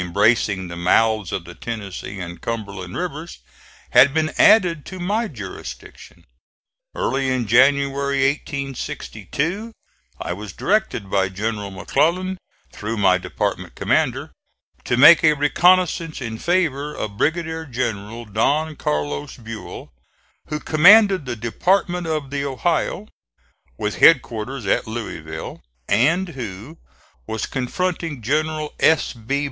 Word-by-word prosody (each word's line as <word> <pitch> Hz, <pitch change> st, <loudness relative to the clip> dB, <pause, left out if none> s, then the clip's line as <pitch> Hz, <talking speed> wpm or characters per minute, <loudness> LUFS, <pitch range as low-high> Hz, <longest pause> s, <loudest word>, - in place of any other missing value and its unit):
Smith, 90 Hz, -, -3 dB
embracing 100 Hz, 0 st, +2 dB
the 85 Hz, -, -7 dB
mouths 105 Hz, +3 st, +2 dB
of -, -, -3 dB
the -, -, -10 dB
Tennessee 105 Hz, -3 st, -6 dB
and 85 Hz, -1 st, -7 dB
Cumberland 100 Hz, -5 st, -5 dB
rivers, 170 Hz, -2 st, -5 dB, 0.5 s
had 140 Hz, +2 st, +6 dB
been 155 Hz, -1 st, +1 dB
added 180 Hz, -8 st, +5 dB
to 185 Hz, -, -8 dB
my 210 Hz, +6 st, -1 dB
jurisdiction. 105 Hz, -, -10 dB, 0.7 s
Early 135 Hz, 0 st, 0 dB
in 130 Hz, -2 st, 0 dB
January, 140 Hz, +3 st, +3 dB
1862, 140 Hz, -, -4 dB, 0.5 s
I -, -, -3 dB
was 100 Hz, 0 st, -8 dB
directed 150 Hz, -, -1 dB
by 95 Hz, -1 st, +2 dB
General 105 Hz, +1 st, -3 dB
McClellan, 170 Hz, -, 0 dB, 0.3 s
through 110 Hz, +2 st, -4 dB
my 95 Hz, -2 st, +4 dB
department -, -, -3 dB
commander, -, -, 0 dB, 0.5 s
to 120 Hz, -, 0 dB
make 155 Hz, +6 st, +8 dB
a 155 Hz, -1 st, +6 dB
reconnoissance 165 Hz, +2 st, +2 dB
in 115 Hz, -4 st, -5 dB
favor 155 Hz, -5 st, 0 dB
of 100 Hz, -2 st, -5 dB
Brigadier 160 Hz, +1 st, -1 dB
General 115 Hz, -2 st, -4 dB
Don 145 Hz, +9 st, 0 dB
Carlos 75 Hz, -1 st, -3 dB
Buell, 115 Hz, -, -9 dB, 0.5 s
who 150 Hz, -, -3 dB
commanded 190 Hz, -, +5 dB
the 120 Hz, -, -3 dB
Department 175 Hz, -, 0 dB
of 155 Hz, -4 st, -3 dB
the 140 Hz, 0 st, -2 dB
Ohio, 165 Hz, +8 st, -1 dB, 0.7 s
with 105 Hz, -1 st, -3 dB
headquarters 125 Hz, -4 st, +3 dB
at 95 Hz, -, +1 dB
Louisville, 80 Hz, -9 st, -6 dB, 0.3 s
and 170 Hz, +9 st, +2 dB
who 125 Hz, -, -8 dB, 0.5 s
was 110 Hz, -2 st, -3 dB
confronting 160 Hz, +1 st, -3 dB
General 155 Hz, +3 st, -1 dB
S. 160 Hz, 0 st, +3 dB
B. 120 Hz, +4 st, -3 dB
135 Hz, 120 wpm, -21 LUFS, 105-160 Hz, 0.7 s, make